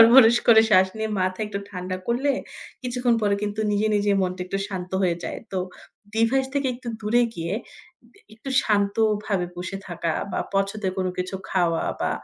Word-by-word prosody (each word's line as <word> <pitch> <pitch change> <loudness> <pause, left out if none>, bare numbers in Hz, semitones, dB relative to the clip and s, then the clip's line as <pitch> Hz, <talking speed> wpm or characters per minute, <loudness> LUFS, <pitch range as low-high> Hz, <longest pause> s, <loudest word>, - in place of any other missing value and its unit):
বড়, 225 - +11
বড় 235 -3 +8
করে 220 -1 +9
শ্বাস 190 -1 +6
নিয়ে 220 0 -2
মাথা 185 +3 -1
একটু 200 -1 -4
ঠান্ডা 185 -1 -4
করলে 255 +4 +1 0.5
কিছুক্ষণ 245 -1 +1
পরে 205 -1 +3
কিন্তু 210 +1 -2
নিজে, 205 +1 +2
নিজে 205 0 +2
মনটা 185 0 -2
একটু 195 +2 -2
শান্ত 180 -2 -5
হয়ে 175 -2 +2
যায়। - - -4
তো 190 - 0 0.6
ডিভাইস 245 +4 +2
থেকে 280 -1 +1
একটু 245 -1 -8
দূরে 225 +3 +3
গিয়ে 165 +2 -3 0.6
দ - - -40 0.2
একটু 250 +5 -8
শান্তভাবে 205 -2 +1
বসে 185 +2 -4
থাকা 170 -2 -2 0.2
বা - - -1 0.2
পছন্দের 195 -1 0
কোন 185 - 0
কিছু 185 +1 -3 0.2
খাওয়া 175 -3 +1 0.2
বা - - +1
205 Hz, 175 wpm, -24 LUFS, 185-225 Hz, 0.6 s, বড়